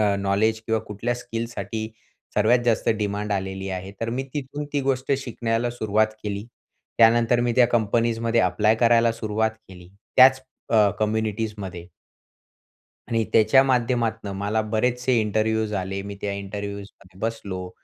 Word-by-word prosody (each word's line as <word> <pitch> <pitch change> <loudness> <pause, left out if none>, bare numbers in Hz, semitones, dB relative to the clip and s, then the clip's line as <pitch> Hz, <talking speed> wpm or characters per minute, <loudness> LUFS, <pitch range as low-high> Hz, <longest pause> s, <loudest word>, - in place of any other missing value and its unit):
अ, 100 -1 +2
knowledge 105 +3 +1
किंवा 110 0 +1
कुठल्या 110 +3 -3
स्किल्ससाठी 115 -2 -5 0.5
सर्वात 110 +4 +4
जास्त 115 -2 +1
डिमांड 105 0 -2
आलेली 95 0 -3
आहे. 95 +1 -5
तर 115 0 -2
मी 125 +3 -2
तिथून 145 +1 -4
ती 145 - +1
गोष्ट 135 0 0
शिकण्याला 120 -1 -1
सुरुवात 110 -2 +1 0.2
केली. 100 -1 -4 0.5
त्यानंतर 115 +1 +5
मी 120 -1 +1
त्या 125 - +6
कंपनीजमध्ये 115 0 +1
ॲप्लाय 110 +1 +3
करायला 115 0 +4
सुरुवात 110 -1 -1 0.2
केली, 90 -2 -13 0.3
त्याच 130 0 +7 0.3
अ, 105 -2 +5
कम्युनिटीजमध्ये. 105 -4 -2 1.2
आणि 115 -1 +1
त्याच्या 130 +5 +6
माध्यमातनं 115 -4 0
मला 105 +2 0
बरेचसे 125 +4 0
इंटरव्ह्यूज 110 +1 0
आले. 95 +1 -3
मी 100 0 -7
त्या 100 - -2
इंटरव्ह्यूज 100 0 -5 0.2
मध्ये 95 0 -20
बसलो 100 -5 -4
110 Hz, 140 wpm, -24 LUFS, 100-120 Hz, 1.2 s, त्याच